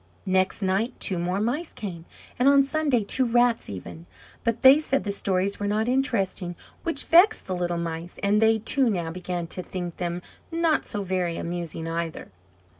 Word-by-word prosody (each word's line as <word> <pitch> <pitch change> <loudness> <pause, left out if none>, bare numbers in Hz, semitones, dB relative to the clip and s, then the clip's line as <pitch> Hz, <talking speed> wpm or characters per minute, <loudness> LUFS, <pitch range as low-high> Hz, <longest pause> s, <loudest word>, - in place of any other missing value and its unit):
Next 190 +2 +1
night 200 +6 0
two 185 -4 -1
more 180 +3 -1
Mice 260 +10 -1
came, 175 -6 -7 0.3
and 260 +2 +5
on 280 0 +6
Sunday 275 -5 +1
two 260 +6 +1
Rats, 240 0 +2
even; 85 -3 -8 0.4
but 230 0 -1
they 265 +3 +9
said 275 -3 0
the 205 - -2
stories 195 0 -1
were 205 - -1
not 215 +2 0
interesting, 215 -9 0 0.3
which 330 -4 -2
vexed 370 +6 +5
the 185 - -3
little 175 -1 -1
Mice; 170 +1 -5
and 205 +2 +3
they, 220 0 +5
too, 250 +4 +2
now 170 -6 -2
began 180 0 -4
to 185 - -4
think 175 -2 -6
them 175 0 -3 0.3
not 330 -1 +1
so 205 -3 -3
very 180 -3 -1
amusing 170 -1 -4
either. 165 -5 -4
200 Hz, 180 wpm, -25 LUFS, 175-245 Hz, 0.4 s, they